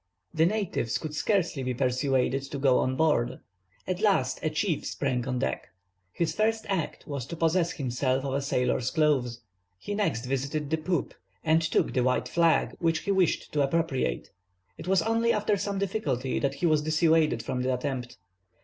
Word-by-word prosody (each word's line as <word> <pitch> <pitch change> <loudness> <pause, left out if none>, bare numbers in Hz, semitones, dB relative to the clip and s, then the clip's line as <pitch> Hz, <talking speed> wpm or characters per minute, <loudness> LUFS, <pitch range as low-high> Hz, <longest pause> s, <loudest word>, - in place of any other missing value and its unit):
The 160 0 +4
natives 195 - -1
could 155 -2 -6
scarcely 175 -4 0
be 125 -1 -2
persuaded 130 +1 +1
to 140 - -4
go 135 -2 +3
on 130 0 0
board. 130 -5 +1 0.5
At 185 +1 -3
last 130 -12 +2
a 155 - 0
chief 155 +1 -1
sprang 130 -4 -2
on 125 -1 -1
deck. 65 - -2 0.4
His 165 - -1
first 220 +1 0
act 190 -5 -2
was 140 -4 -5
to 170 - -5
possess 165 +1 +1
himself 130 0 -1
of 135 - -2
a 140 - 0
sailor's 125 -2 0
clothes. 130 -6 +1 0.4
He 205 - -5
next 195 - -1
visited 140 +3 -2
the 160 - +2
poop 155 -1 -1 0.3
and 160 +1 +3
took 160 - +1
the 125 - +2
white 125 0 +1
flag, 165 -1 +2
which 165 -2 +1
he 200 - -1
wished 190 -4 +1
to 150 - +1
appropriate. 135 - 0 0.4
It - - -10
was 190 -2 +3
only 230 +1 +2
after 210 -1 +1
some 200 0 -2
difficulty 150 - -1
that 140 -1 -1
he 155 - -2
was 155 -2 +3
dissuaded 155 -4 +2
from 125 +2 -2
the 130 +1 0
attempt. 125 -2 -3
150 Hz, 180 wpm, -28 LUFS, 130-170 Hz, 0.5 s, The